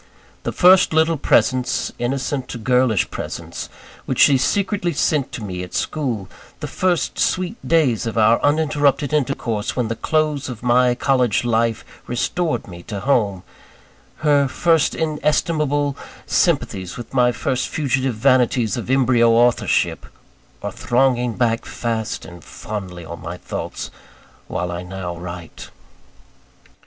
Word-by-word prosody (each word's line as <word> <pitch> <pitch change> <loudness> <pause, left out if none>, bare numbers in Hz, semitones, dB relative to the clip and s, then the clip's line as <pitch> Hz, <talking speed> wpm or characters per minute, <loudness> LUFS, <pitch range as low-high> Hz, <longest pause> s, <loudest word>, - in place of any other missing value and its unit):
The - - -3
first 180 -1 +5
little 160 +1 +3
presents 130 -3 +1
innocent 130 -1 -3
girlish 125 -4 +2
presents - - -6 0.4
which - - -2
she 140 - +6
secretly 185 +5 0
sent 145 -1 0
to 115 - -5
me 90 -3 -5
at 90 - -8
school; 125 -11 -2 0.3
the - - -5
first 180 -3 -1
sweet 185 +3 0
days 135 -9 +2
of 115 - -4
our 115 +1 +5
uninterrupted 145 -1 +2
intercourse, 115 -7 -1
when 120 -4 -1
the 115 - -2
close 150 0 0
of 120 -2 -8
my 125 0 +3
college 125 -4 +1
life 115 -1 0 0.2
restored 155 +7 -1
me 85 -2 -10
to 100 +2 -6
home; 105 -7 +1 0.8
her 145 -2 +4
first 165 +3 +2
inestimable 150 -2 0 0.3
sympathies 95 -2 0
with 120 0 -9
my 125 -2 +4
first 125 +2 -2
fugitive 135 -4 -1
vanities 125 -3 +2
of 120 - -5
embryo 125 -3 +4
authorship, 120 +1 +2 0.6
are - - -3
thronging 125 -1 +1
back 115 -2 +1
fast 115 -2 -3
and 85 -1 -12
fondly 95 -5 -7
on 85 +1 -8
my 85 +2 -6
thoughts, - - -6 0.6
while 90 0 -3
I 85 0 -4
now 90 -1 -6
write. 85 -1 -8
125 Hz, 130 wpm, -20 LUFS, 110-145 Hz, 0.8 s, she